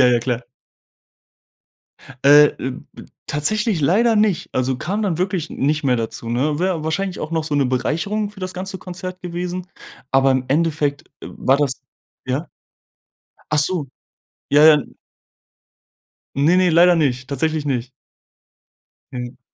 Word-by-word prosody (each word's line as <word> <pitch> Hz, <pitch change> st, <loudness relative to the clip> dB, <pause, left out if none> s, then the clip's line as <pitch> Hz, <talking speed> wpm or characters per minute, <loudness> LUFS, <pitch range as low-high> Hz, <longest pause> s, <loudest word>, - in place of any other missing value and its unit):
Ja, 130 Hz, -, +7 dB
ja 120 Hz, -1 st, +4 dB
klar. 120 Hz, 0 st, -2 dB, 1.8 s
Äh, 145 Hz, +1 st, +8 dB
b 130 Hz, -, -3 dB, 0.2 s
b -, -, -11 dB, 0.2 s
tatsächlich 210 Hz, -, 0 dB
leider 220 Hz, +10 st, +3 dB
nicht 210 Hz, -5 st, +1 dB
also, 130 Hz, 0 st, 0 dB
kam 200 Hz, +11 st, -3 dB
dann 185 Hz, -6 st, -1 dB
wirklich 185 Hz, -3 st, -2 dB
nicht 150 Hz, +3 st, -1 dB
mehr 125 Hz, -2 st, +2 dB
dazu, 115 Hz, 0 st, -5 dB
ne? 140 Hz, +6 st, 0 dB
Wäre 180 Hz, -2 st, -1 dB
wahrscheinlich 180 Hz, +4 st, -2 dB
auch 155 Hz, -, -5 dB
noch 165 Hz, -1 st, -1 dB
so 155 Hz, -1 st, -3 dB
'ne 140 Hz, -2 st, +2 dB
Bereicherung 170 Hz, +11 st, -1 dB
für 210 Hz, -2 st, -15 dB
das 185 Hz, 0 st, -5 dB
ganze 190 Hz, +1 st, -5 dB
Konzert 185 Hz, 0 st, -7 dB
gewesen, 180 Hz, +1 st, -4 dB, 0.4 s
aber 135 Hz, 0 st, +4 dB
im 130 Hz, -1 st, 0 dB
Endeffekt, 150 Hz, -1 st, 0 dB, 0.2 s
äh, -, -, -8 dB
war 135 Hz, -, +1 dB
das 140 Hz, -3 st, -1 dB, 0.5 s
ja? 135 Hz, +6 st, -2 dB, 1.0 s
Ach 155 Hz, -, +1 dB
so. 150 Hz, 0 st, +3 dB, 0.6 s
Ja, 150 Hz, +1 st, +6 dB
ja, 155 Hz, -1 st, +9 dB
n 145 Hz, -, -4 dB, 1.4 s
Ne, 150 Hz, +6 st, +3 dB
ne, 185 Hz, -1 st, +3 dB
leider 175 Hz, +2 st, +6 dB
nicht, 130 Hz, -5 st, 0 dB
tatsächlich 155 Hz, +2 st, -1 dB
nicht. 125 Hz, -3 st, -2 dB, 1.2 s
Mhm, 125 Hz, 0 st, -6 dB
155 Hz, 145 wpm, -20 LUFS, 135-180 Hz, 1.8 s, ja